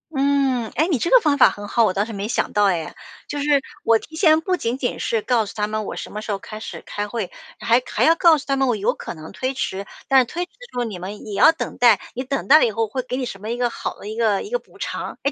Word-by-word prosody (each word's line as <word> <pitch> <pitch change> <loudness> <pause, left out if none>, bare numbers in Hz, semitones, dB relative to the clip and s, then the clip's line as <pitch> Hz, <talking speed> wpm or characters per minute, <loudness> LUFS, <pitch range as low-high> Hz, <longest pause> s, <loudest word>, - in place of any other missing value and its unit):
嗯， 270 -4 +1
哎， 315 +6 +2
你 305 - +2
这 340 - -1
个 - - +8
方 295 -7 +1
法 - - +7
很 205 0 -8
好， 235 - +2
我 200 -4 +2
倒 200 +2 0
是 225 - -8
没 200 +1 -4
想 - - -1
到 205 -1 +3
哎。 170 -6 -1 0.3
就 290 - -4
是 285 -1 +3 0.2
我 225 -1 +4
提 315 - -13
前 315 -2 +5
不 365 +2 0
仅 240 -4 -2
仅 250 -3 -2
是 225 -2 0
告 235 -3 +1
诉 200 - -9
他 210 -1 -1
们 215 0 -2
我 - - -5
什 - - -7
么 210 - -5
时 215 - -5
候 195 - -2
开 215 +2 -9
始 - - -7
开 205 0 -4
会， 220 -5 -3 0.3
还 235 +2 +3
还 - - 0
要 325 +1 +6
告 335 -2 +5
诉 280 - -8
他 275 - +1
们 270 -1 +1
我 240 - +2
有 200 - +1
可 - - -7
能 155 -1 -10
推 260 +1 -2
迟， 195 -6 -3 0.2
但 270 - +4
是 255 - +3
推 350 +8 -4
迟 - - -40
的 - - -15
时 250 - -9
候 240 - 0
你 210 -5 -6
们 190 +4 -8
也 210 - -7
要 260 - +6
等 325 - -6
待， 235 -5 +5 0.2
你 255 - -3
等 275 +1 -3
待 300 +3 +9
了 310 - +4
以 225 - 0
后， 225 +1 -1 0.2
给 255 - -2
你 260 - -2
什 195 -4 -7
么 215 - -6
一 240 - -2
个 245 -1 +1
好 - - -6
的 205 - -9
一 215 - -5
个 215 -4 +2
一 - - -8
个 - - 0
补 - - -21
偿。 - - -5
哎， 280 - +1
240 Hz, 335 characters per minute, -22 LUFS, 210-280 Hz, 0.3 s, 待